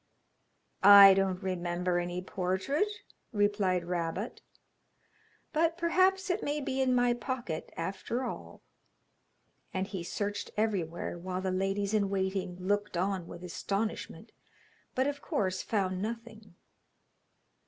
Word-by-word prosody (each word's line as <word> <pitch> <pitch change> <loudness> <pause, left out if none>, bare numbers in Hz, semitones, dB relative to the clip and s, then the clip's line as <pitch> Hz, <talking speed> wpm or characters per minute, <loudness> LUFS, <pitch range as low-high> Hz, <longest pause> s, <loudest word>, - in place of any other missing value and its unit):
'I 200 0 +11
don't 190 0 0
remember 175 -1 -1
any 175 +1 -3
portrait,' 190 - -1 0.3
replied 205 -5 +1
Rabot; 175 +4 -3 1.1
'but 330 +2 +2
perhaps 370 +2 +2
it 360 - -1
may 290 +1 -1
be 265 -1 -1
in 255 -1 +3
my 245 0 +3
pocket 240 - -4
after 195 +8 -3
all.' - - -7 1.1
And 185 +1 0
he 190 -3 -5
searched 205 +3 -3
everywhere, 175 -6 -1
while 185 +1 -3
the 190 0 -1
ladies 195 +2 -1
in 205 -2 +2
waiting 190 -2 -1
looked 205 0 -1
on 185 -1 -1
with 175 - -9
astonishment, 200 +4 -3 0.6
but 260 - +2
of 285 0 -2
course 185 -2 -1
found 190 -4 -1
nothing. 220 -3 -6
195 Hz, 120 wpm, -31 LUFS, 185-235 Hz, 1.1 s, I